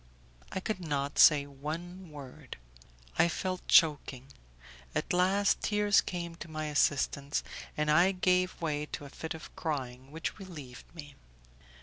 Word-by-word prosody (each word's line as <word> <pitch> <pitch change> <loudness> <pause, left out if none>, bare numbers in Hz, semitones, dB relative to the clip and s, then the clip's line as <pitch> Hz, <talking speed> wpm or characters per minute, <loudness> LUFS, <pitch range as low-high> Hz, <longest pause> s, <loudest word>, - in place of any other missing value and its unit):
I - - -2
could 210 +1 -3
not 145 -4 -2
say 145 -2 +7
one 165 +6 -7
word; 140 -2 -10 0.6
I - - +6
felt 185 +2 -3
choking; 140 -4 +4 0.7
at - - -1
last 190 +3 +3
tears 210 -1 +3
came 170 -2 -5
to 170 - -9
my 155 0 -4
assistance, 145 -1 +1 0.3
and 150 0 +2
I 175 +5 +5
gave 185 -1 +1
way 150 -2 -2
to 145 - -6
a - - -9
fit 160 +2 -5
of 160 - -11
crying 130 -5 -4
which 160 +7 -5
relieved 150 -10 -10
me. 145 -3 -9
155 Hz, 140 wpm, -31 LUFS, 145-180 Hz, 0.7 s, say